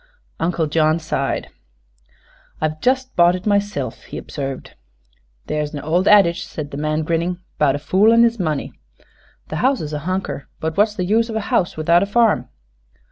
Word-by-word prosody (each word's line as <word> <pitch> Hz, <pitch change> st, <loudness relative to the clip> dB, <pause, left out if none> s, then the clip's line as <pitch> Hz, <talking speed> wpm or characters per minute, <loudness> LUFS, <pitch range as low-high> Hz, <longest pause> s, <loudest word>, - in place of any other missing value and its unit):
Uncle 165 Hz, -1 st, 0 dB
John 155 Hz, +1 st, +2 dB
sighed. 160 Hz, -1 st, -2 dB, 1.1 s
"I've 155 Hz, 0 st, -2 dB
just 260 Hz, 0 st, 0 dB
bought 175 Hz, +1 st, +5 dB
it 185 Hz, -, -7 dB
myself," 205 Hz, 0 st, -1 dB
he -, -, -8 dB
observed. 135 Hz, -2 st, -6 dB, 0.7 s
"There's 150 Hz, 0 st, -3 dB
a 145 Hz, -, -5 dB
ol' 170 Hz, +5 st, +1 dB
addige," 180 Hz, -4 st, +5 dB
said 145 Hz, -2 st, -7 dB
the 140 Hz, -, -6 dB
man, 155 Hz, +1 st, -1 dB
grinning, 170 Hz, +3 st, -1 dB, 0.2 s
"'bout 145 Hz, -2 st, +3 dB
a -, -, -1 dB
fool 190 Hz, +9 st, +3 dB
an' 230 Hz, 0 st, +6 dB
his 230 Hz, -1 st, +2 dB
money. 155 Hz, -5 st, -2 dB, 0.8 s
The 155 Hz, -, -3 dB
house 260 Hz, +5 st, +2 dB
is 155 Hz, -1 st, -5 dB
a 150 Hz, -, -2 dB
hunker; 185 Hz, -6 st, -3 dB
but 160 Hz, 0 st, -2 dB
w'at's 210 Hz, +4 st, +2 dB
the 180 Hz, -, -2 dB
use 225 Hz, +4 st, +2 dB
of 220 Hz, -, -4 dB
a -, -, +1 dB
house 175 Hz, -, +1 dB
without 170 Hz, +2 st, +3 dB
a 200 Hz, -, 0 dB
farm?" 225 Hz, +1 st, +2 dB
170 Hz, 180 wpm, -20 LUFS, 155-205 Hz, 1.1 s, an